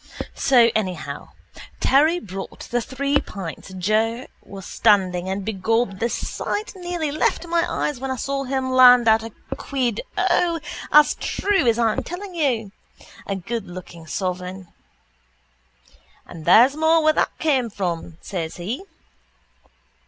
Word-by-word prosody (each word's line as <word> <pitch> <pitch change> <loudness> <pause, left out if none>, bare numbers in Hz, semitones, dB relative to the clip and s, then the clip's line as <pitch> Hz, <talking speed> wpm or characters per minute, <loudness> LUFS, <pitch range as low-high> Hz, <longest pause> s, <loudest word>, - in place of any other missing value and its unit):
So 240 -4 +4
anyhow 190 -5 -3 0.5
Terry 310 +6 +4
brought 195 - -8
the 240 0 +1
three 280 +4 0
pints 190 -1 -8
Joe 220 +6 0 0.2
was 195 -1 -10
standing 190 -5 +2
and 190 0 -3
begob 220 0 0
the 235 - 0
sight 420 - -3
nearly 350 -4 -3
left 310 +3 0
my 340 0 0
eyes 290 -4 -2
when 265 +1 -4
I 260 - -1
saw 275 +2 -3
him 260 0 -2
land 250 -2 +7
out 220 0 +5
a 225 0 -8 0.3
quid. 250 -6 -2 0.2
O, 355 -2 +2 0.3
as 300 0 +6
true 390 -9 0
as 230 -1 +3
I'm 225 -2 +1
telling 365 +2 -7
you. 250 - 0 0.6
A 195 - -1
goodlooking 185 -4 -7
sovereign. 180 +2 -4 1.6
—And 160 -3 -11
there's 240 +10 +6
more 320 +1 +3
where 310 0 +4
that - - 0
came 270 -7 +1
from, 175 -5 -4
says 165 -5 -4
he. 215 - -4
235 Hz, 135 wpm, -22 LUFS, 190-285 Hz, 1.6 s, land